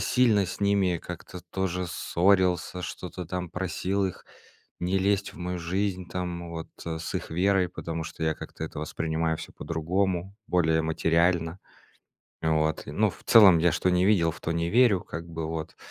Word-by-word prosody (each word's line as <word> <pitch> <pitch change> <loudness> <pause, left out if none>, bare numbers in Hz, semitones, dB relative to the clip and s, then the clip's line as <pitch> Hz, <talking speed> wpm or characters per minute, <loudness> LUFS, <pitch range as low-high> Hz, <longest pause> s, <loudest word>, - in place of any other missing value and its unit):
сильно 110 -6 +3
с 95 - -6
ними 100 -3 +2
как-то 90 +1 -8
тоже 90 -1 -1
ссорился, 90 +1 +1
что-то 90 0 -6
там 90 -1 -4
просил 95 +2 -1
их 90 - -7 0.6
не 90 +2 +1
лезть 100 +1 +1
в - - -13
мою 90 0 -3
жизнь 90 +1 -2
там 85 -1 -4
вот, 80 -1 -6 0.2
с 80 -1 -4
их - - -3
верой, 90 +2 +2
потому 80 -2 -5
что 80 - -7
я 80 0 +1
как-то - - -9
это 80 - -7
воспринимаю 80 +1 -1
всё - - -8
по-другому, 90 +3 -1
более 80 -2 +2
материально. 85 +2 +1 0.8
Вот. 80 -1 +1
Ну, 105 +10 +1
в 85 - -13
целом 100 -7 +8
я 85 +1 +4
что 90 +2 +1
не 90 +1 +3
видел, 90 -5 +4
в 85 - -12
то 80 - -2
не 85 0 0
верю 115 -4 +4
как 85 +1 -7
бы, 80 -1 -4
вот. 80 -1 -5
90 Hz, 170 wpm, -27 LUFS, 80-95 Hz, 0.8 s, целом